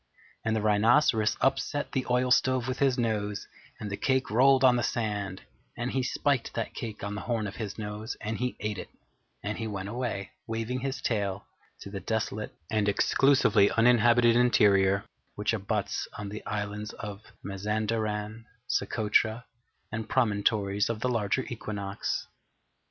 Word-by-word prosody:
And 110 -1 +1
the 110 - -1
Rhinoceros 110 +2 +4
upset 145 +2 0
the 130 -2 -1
oil 125 +1 +2
stove 130 -1 +3
with 130 0 -3
his 135 -2 +3
nose, 105 -3 -1 0.3
and 105 -1 -5
the 100 - -3
cake 130 -3 +1
rolled 135 +3 +5
on 125 -1 +7
the 120 - +1
sand, 105 -5 -2 0.3
and 120 +1 -2
he 130 - 0
spiked 130 0 0
that 115 - -3
cake 110 -4 -6
on 100 0 -3
the 105 - -4
horn 115 -3 -1
of 100 +1 -6
his 105 -3 -5
nose, 105 +2 -5
and 110 +1 -4
he 125 0 -1
ate 105 -2 -2
it, - - -7 0.5
and 105 +1 -3
he 115 - -2
went 100 -2 -4
away, 115 -4 -3 0.2
waving 115 +2 -2
his 135 0 -4
tail, 100 -4 -1 0.4
to 100 - -8
the 100 - -4
desolate 110 +1 -3 0.2
and 105 -2 +2
Exclusively 115 -2 +4
Uninhabited 120 0 +5
Interior 100 -5 +4 0.3
which 105 +2 0
abuts 105 0 -2
on 105 -1 -5
the 105 +2 -7
islands 105 0 -3
of 105 -1 -7 0.2
Mazanderan, 105 +2 -2 0.2
Socotra, 110 0 +1 0.5
and 110 0 -4
Promontories 105 -4 +1
of 115 -1 -3
the 125 - +1
Larger 115 +1 0
Equinox. 100 -4 -3
110 Hz, 155 wpm, -28 LUFS, 105-120 Hz, 0.5 s, on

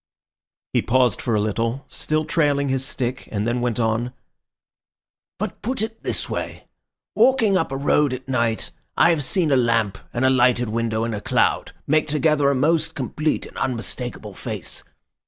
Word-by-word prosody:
He - - +3
paused 125 -3 +2
for 115 -3 0
a - - +2
little, 115 +5 -1
still 155 0 -1
trailing 145 -4 +1
his 130 0 0
stick, 130 -1 -3
and 105 +1 -1
then 120 +1 0
went 120 -2 -1
on— 115 +2 0 1.2
"But - - -4
put 240 0 -1
it 225 0 -5
this - - -1
way. - - -5 0.5
Walking 240 -7 +4
up 165 -7 +1
a 135 - -2
road 145 0 +2
at 130 +1 -6
night, 115 -4 0 0.3
I 170 - +6
have 155 -4 0
seen 165 +2 +1
a - - +5
lamp 115 -5 +1
and 120 +2 0
a - - +5
lighted 125 -2 +3
window 115 0 -1
and 115 0 -2
a 105 - -4
cloud - - +1
make 155 +1 +2
together 150 -1 +2
a 140 - +2
most 160 +4 +1
complete 150 +3 -1
and - - -13
unmistakable 120 -3 -3
face. - - -4
130 Hz, 175 wpm, -22 LUFS, 115-150 Hz, 1.2 s, I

